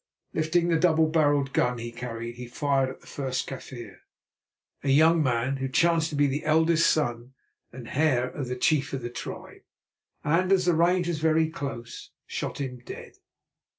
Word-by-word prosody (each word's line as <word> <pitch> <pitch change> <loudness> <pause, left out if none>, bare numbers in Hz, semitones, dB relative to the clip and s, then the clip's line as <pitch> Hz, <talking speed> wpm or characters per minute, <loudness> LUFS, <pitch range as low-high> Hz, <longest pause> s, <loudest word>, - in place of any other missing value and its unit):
Lifting 170 +2 +1
the 165 -1 +2
double 160 -2 +4
barrelled 145 -3 +2
gun 125 0 +1
he 115 0 -6
carried, 120 -1 -6
he 125 0 -7
fired 135 +1 0
at 130 - -10
the - - -20
first 130 -2 -3
Kaffir, 120 -6 -8 0.9
a 140 - -1
young 160 +4 +5
man 130 0 0
who 135 0 -2
chanced 165 +3 +2
to 150 - -5
be 145 0 +3
the 140 +2 -1
eldest 160 +1 +3
son 120 -3 -1 0.4
and 120 -2 -10
heir 130 -4 +2
of 135 0 -5
the 125 - -3
chief 145 +1 +1
of 135 -2 -3
the 120 - -4
tribe, - - -8 0.6
and, 175 +5 +1
as 185 -2 +4
the 175 - +3
range 175 +2 +2
was 170 -3 -2
very 160 0 +2
close, 135 -6 -7 0.2
shot - - -5
him 125 -3 -5
dead. - - -10
145 Hz, 180 wpm, -26 LUFS, 125-160 Hz, 0.9 s, young